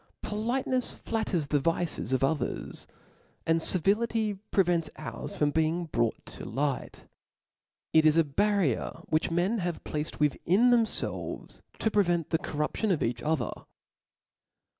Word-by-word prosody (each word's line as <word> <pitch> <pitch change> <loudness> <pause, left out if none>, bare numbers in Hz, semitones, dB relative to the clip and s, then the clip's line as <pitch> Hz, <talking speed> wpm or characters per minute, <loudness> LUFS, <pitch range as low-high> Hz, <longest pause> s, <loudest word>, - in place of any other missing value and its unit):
Folitenefs 250 +4 -1
Batters 210 -8 0
the 145 +1 +1
vices 165 0 -1
of 130 0 +2
others, 145 +2 -1 0.6
and 165 0 +2
civility 210 +5 +2 0.2
prevents 175 -5 +2
ours 155 - -6
from 145 -1 +2
being 160 +3 +1
brought 120 -7 -1
to - - -8
light. 140 0 -2 0.9
It 160 - +6
is 155 +1 +5
a 165 - +6
barrier 185 - 0
which 155 0 +1
men 180 +7 +1
have 175 -2 -3
placed 150 0 -4
within 185 - +3
themfelves 230 -2 -1 0.2
to 220 - 0
prevent 175 -6 +2
the 160 - +2
corruption 150 +6 -2
of 180 -6 +2
each 120 +1 -1
other. 150 -3 0
165 Hz, 130 wpm, -29 LUFS, 150-210 Hz, 0.9 s, It